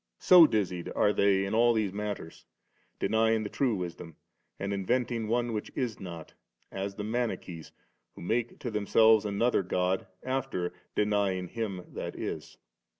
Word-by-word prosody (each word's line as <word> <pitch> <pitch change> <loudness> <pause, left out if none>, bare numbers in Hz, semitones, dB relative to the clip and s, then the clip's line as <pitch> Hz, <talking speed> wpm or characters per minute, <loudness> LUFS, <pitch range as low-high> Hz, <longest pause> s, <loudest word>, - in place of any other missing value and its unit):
So 175 -3 +8
dizzied' 90 - -1
are 105 - +3
they 100 -1 +3
in 100 - -3
all 120 +1 +4
these 105 -4 0
matters, 105 -5 -5 0.5
denying 110 0 +2
the 105 - -4
true 130 -5 +1
Wisdom, 85 -3 -6 0.4
and 100 +1 -2
inventing 115 +3 -1
one 120 +1 0
which 105 - -4
is 120 -4 -2
not, 85 -4 -8 0.4
as 100 0 -4
the 105 - -5
Manichees 110 -7 -3 0.4
who - - -10
mskt 115 +5 -1
to 120 - -5
themselves 110 +1 +4
another 105 +3 +1
God, 90 +1 -1 0.2
after 130 -9 -2 0.2
denying 100 -4 +1
Him 105 -6 -4
that - - -5
is. - - -6
105 Hz, 150 wpm, -29 LUFS, 95-115 Hz, 0.5 s, So